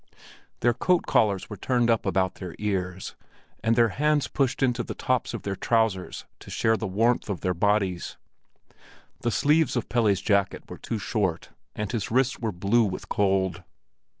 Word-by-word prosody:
Their 120 0 +3
coat 175 +9 +1
collars 100 -4 +2
were 105 - -8
turned 120 +3 +1
up 115 - 0
about 95 -1 +1
their 90 -3 -8
ears, 95 -3 -3 0.5
and 115 0 +3
their 115 -1 +4
hands 150 +6 +1
pushed 135 -1 0
into 125 -2 +1
the - - -6
tops 130 -1 0
of - - -7
their 100 -1 -2
trousers 110 -4 0
to - - -13
share 110 - +1
in 110 - -1
the - - -2
warmth 115 +5 +1
of 100 - -3
their 90 - 0
bodies. 95 -1 0 1.0
The 120 - -1
sleeves 150 +6 +2
of 120 - -2
Pelle's 110 -5 +2
jacket 100 0 +1
were - - -9
too 115 - -3
short, 100 -5 -2 0.3
and 105 -1 -3
his 110 -5 -2
wrists 130 +2 +1
were 115 -2 -2
blue 100 +6 +2
with 100 -4 -4
cold. 95 -3 +1
105 Hz, 175 wpm, -26 LUFS, 95-120 Hz, 1.0 s, their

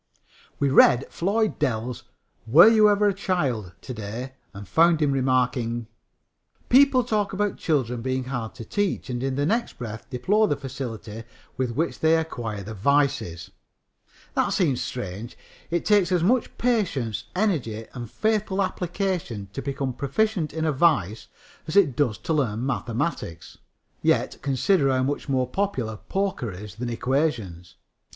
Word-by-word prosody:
We 140 -1 +1
read 130 -1 +6
Floyd 210 +4 0
Dell's 125 -4 -2 0.4
Were 155 - +8
You 215 -2 +6
Ever 205 0 +3
a - - 0
Child? 140 - -1
to 130 - -7
day 115 +4 -6 0.2
and 100 0 -10
found 165 - +4
him 150 -2 +2
remarking: 125 -3 0 0.8
"People 260 0 +6
talk 210 -3 -1
about 205 +1 -1
children 125 -7 0
being 130 +1 -1
hard 120 -4 -5
to 115 - -8
teach 205 - -1
and 120 0 -3
in 135 0 -1
the 145 +1 0
next 230 +8 -1
breath 110 -3 -7
deplore 195 - +2
the 145 - +1
facility 120 -5 -6 0.3
with 130 -1 -1
which 165 +5 -1
they 160 +1 +4
acquire 115 -10 -4
the 110 +3 -7
'vices.' 140 - 0 0.8
That - - +1
seems 145 -9 +1
strange. 115 -1 -6 0.3
It 170 0 -1
takes 205 -4 +3
as 175 -2 +2
much 240 +7 +1
patience, 185 - 0
energy 140 - -1
and 120 -3 -7
faithful 210 - 0
application 180 - -3
to 135 - -4
become 135 -2 -3
proficient 170 - 0
in 160 +1 -2
a 155 - +2
vice 130 - +1 0.4
as 155 - -4
it 170 -11 +5
does 120 -7 +1
to 160 - -3
learn 125 -6 0
mathematics. 120 - -3 0.4
Yet - - +1
consider 140 +3 +2
how 130 -1 +2
much 145 +2 -2
more 130 -2 +1
popular 125 - -2
poker 190 - -2
is 100 +2 -9
than 120 +4 -4
equations! 115 - -2
135 Hz, 150 wpm, -25 LUFS, 115-180 Hz, 0.8 s, Were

